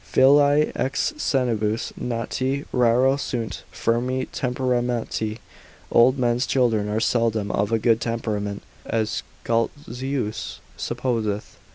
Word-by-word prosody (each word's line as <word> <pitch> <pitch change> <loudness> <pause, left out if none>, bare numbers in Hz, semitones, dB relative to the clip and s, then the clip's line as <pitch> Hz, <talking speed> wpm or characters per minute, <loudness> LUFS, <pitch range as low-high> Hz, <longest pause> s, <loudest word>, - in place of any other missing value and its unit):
Filii 145 +2 +5
ex 135 - 0
senibus 115 - 0
nati, 130 +4 -2
raro 125 +3 +4
sunt 120 -5 -3
firmi 125 +3 0
temperamenti, 125 -5 -1 0.5
old 125 +3 +5
men's 120 0 +1
children 115 -5 +2
are 105 +1 0
seldom 115 -2 +1
of 100 +2 0
a 115 - +3
good 115 0 +2
temperament, 105 -3 -2 0.2
as 110 -1 -1 0.2
Scoltzius 125 0 -2 0.2
supposeth, 115 -4 -2
consult. - - -30
120 Hz, 105 wpm, -23 LUFS, 110-130 Hz, 0.5 s, Filii